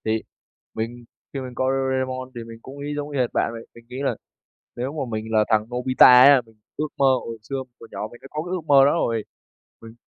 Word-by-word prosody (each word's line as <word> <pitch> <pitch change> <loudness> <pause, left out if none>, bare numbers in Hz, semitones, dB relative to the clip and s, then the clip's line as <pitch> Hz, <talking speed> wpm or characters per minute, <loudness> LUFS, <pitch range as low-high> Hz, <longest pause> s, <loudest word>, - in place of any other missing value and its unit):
Thì 110 0 0 0.5
mình 120 +2 -5 0.3
khi 140 - -3
mình 125 -1 -8
coi 130 +1 +1
Doraemon 130 -1 -1
thì 120 - -5
mình 115 0 -11
cũng 135 +3 -11
nghĩ 145 +1 -4
giống 145 0 -4
y 140 -2 -3
hệt 125 -2 +2
bạn - - +1
vậy. 115 - -7
Mình 115 0 -15
nghĩ 125 - -7
là - - 0 0.6
nếu 125 +4 -3
mà 155 - -4
mình 110 0 -3
là 110 -1 +4
thằng 110 -2 +3
Nobita 130 +1 +6 0.2
á, 140 -1 +8
mình 110 -1 -22 0.2
ước 155 - -1
mơ 140 - +4 0.2
hồi 115 -1 -6
xưa 135 - -2 0.3
hồi 115 - -12
nhỏ 105 - -4
mình 120 - -13
đã - - -11
có 155 +1 -3
cái 175 - -7
ước 185 -2 -2
mơ 140 -2 +7
đó 145 - +4
rồi. 115 -9 0 0.6
Mình 115 0 -11
130 Hz, 245 wpm, -23 LUFS, 115-140 Hz, 0.6 s, á